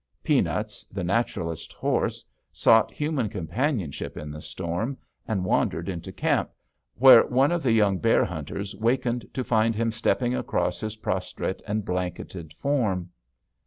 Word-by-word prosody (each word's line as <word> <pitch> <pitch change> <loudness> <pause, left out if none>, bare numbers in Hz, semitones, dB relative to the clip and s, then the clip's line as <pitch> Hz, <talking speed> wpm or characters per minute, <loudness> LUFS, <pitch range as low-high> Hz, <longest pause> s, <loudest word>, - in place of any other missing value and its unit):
Peanuts, - - 0
the 95 -1 -4
naturalist's 90 -4 -2
horse, - - -1 0.3
sought 115 -1 +4
human 150 -7 -1
companionship 105 - -2
in 75 0 -6
the 75 +1 -8
storm, 95 - -3 0.3
and 95 -5 -1
wandered 85 -1 0
into 85 -4 -5
camp, - - 0 0.5
where 130 -2 +8
one 135 +4 +3
of 175 -1 0
the 130 -5 +2
young 105 -4 +3
bear 115 -1 +3
hunters 95 +5 -5
wakened 120 +2 0
to 130 - -3
find 115 -1 +2
him 115 +1 0
stepping 120 +2 0
across - - -1
his 110 0 -4
prostrate 95 -2 -3
and 105 0 -1
blanketed 90 -2 -4
form. 100 - -1
110 Hz, 140 wpm, -26 LUFS, 90-120 Hz, 0.5 s, where